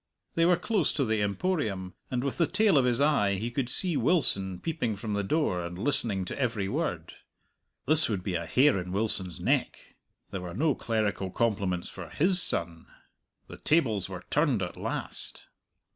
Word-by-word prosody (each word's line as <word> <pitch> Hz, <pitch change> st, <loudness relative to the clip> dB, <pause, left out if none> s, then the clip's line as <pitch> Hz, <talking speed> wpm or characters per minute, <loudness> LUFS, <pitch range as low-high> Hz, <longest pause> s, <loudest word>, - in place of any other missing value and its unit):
They 165 Hz, -, +2 dB
were 175 Hz, 0 st, +4 dB
close 185 Hz, -2 st, 0 dB
to 140 Hz, -3 st, 0 dB
the 110 Hz, -2 st, 0 dB
Emporium, 100 Hz, -, -2 dB, 0.2 s
and 125 Hz, -1 st, -2 dB
with 140 Hz, +3 st, -4 dB
the 170 Hz, -, +3 dB
tail 215 Hz, -5 st, +2 dB
of 130 Hz, -, +1 dB
his 120 Hz, -1 st, +1 dB
eye 140 Hz, -10 st, +2 dB
he 115 Hz, +5 st, -4 dB
could 125 Hz, 0 st, -2 dB
see 180 Hz, +4 st, +3 dB
Wilson 95 Hz, -, +1 dB
peeping 150 Hz, -10 st, -3 dB
from 105 Hz, +1 st, -5 dB
the 100 Hz, -, 0 dB
door 95 Hz, -, 0 dB
and 85 Hz, +1 st, -7 dB
listening 105 Hz, -4 st, 0 dB
to -, -, -6 dB
every 115 Hz, -7 st, -1 dB
word. -, -, -3 dB, 0.7 s
This 155 Hz, 0 st, +3 dB
would 100 Hz, -5 st, -2 dB
be 95 Hz, -, -3 dB
a 85 Hz, -1 st, -3 dB
hair 130 Hz, -, +3 dB
in 90 Hz, 0 st, -6 dB
Wilson's 95 Hz, -4 st, +2 dB
neck! -, -, -2 dB, 0.4 s
There 95 Hz, -, -5 dB
were 90 Hz, -2 st, -7 dB
no 155 Hz, +1 st, +1 dB
clerical 110 Hz, -5 st, -2 dB
compliments 95 Hz, -5 st, -1 dB
for 90 Hz, -3 st, -9 dB
his 180 Hz, -, +6 dB
son! 85 Hz, -, +3 dB, 0.6 s
The -, -, -11 dB
tables 115 Hz, -, 0 dB
were 90 Hz, -2 st, -8 dB
turned 140 Hz, -9 st, +1 dB
at 90 Hz, -, -5 dB
last. -, -, -5 dB
110 Hz, 180 wpm, -28 LUFS, 95-150 Hz, 0.7 s, his